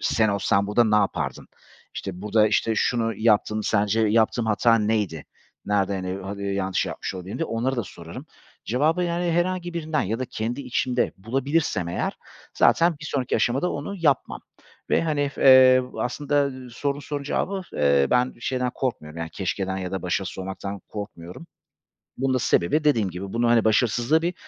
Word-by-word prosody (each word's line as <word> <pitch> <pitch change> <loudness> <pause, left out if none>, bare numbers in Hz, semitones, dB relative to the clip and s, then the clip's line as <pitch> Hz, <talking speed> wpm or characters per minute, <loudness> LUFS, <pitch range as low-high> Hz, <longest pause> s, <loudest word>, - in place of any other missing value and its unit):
sen 110 -1 +2
olsan 100 0 +1
burada 105 +4 +3
ne 105 -1 +3
yapardın? 100 -2 -1 0.5
İşte, 95 -1 -6
burada, 105 +1 +3
işte, 110 +1 +1
şunu 115 0 0
yaptın, 110 -1 +2
sence 105 +1 +1
yaptığım 110 +1 +2
hata 115 +2 +3
neydi? 105 - -1 0.4
Nerede, 95 -2 -1
hani, 100 +1 -4
yanlış 95 -1 -1
yapmış - - -5
olabilirim 95 +2 -6
diye, 165 - -1
onları 125 +4 -1
da 120 - 0
sorarım. 95 - -10 0.4
Cevabı, 155 +10 +1
yani, 175 0 0
herhangi 175 0 -1
birinden 160 -2 -1
ya 110 +5 -2
da 130 - -2
kendi 120 +3 -4
içimde 125 -1 -1
bulabilirsem 130 - -1
eğer 85 - -2 0.4
zaten 170 -2 +4
bir - - -8
sonraki 135 -4 -1
aşamada 135 +9 +1
onu 145 +8 -5
yapmam 145 -6 +1 0.5
ve, - - +3
hani, 145 -3 0
eee, 130 -1 +7 0.2
aslında 145 +2 0 0.2
sorduğun 140 +4 -2
sorunun 145 0 -5
cevabı, 190 +6 -2
eee, 70 -1 +3
ben 125 +1 +2
şeyden 125 0 -1
korkmuyorum, 85 - -4
yani, 80 -1 -4
keşkeden 95 +1 -3
ya 90 -1 -4
da 95 - -4
başarısız 90 +1 -2
olmaktan 95 +1 -5
korkmuyorum. 100 - -8 0.7
Bunun 130 0 0
da 130 - +1
sebebi 150 - +2
dediğim 115 -10 +2
gibi 95 +3 -7
bunu 120 0 +2
hani 115 -2 +4
başarısızlığı 120 +7 +2
bir 175 +2 -1
115 Hz, 160 wpm, -24 LUFS, 100-140 Hz, 0.7 s, eee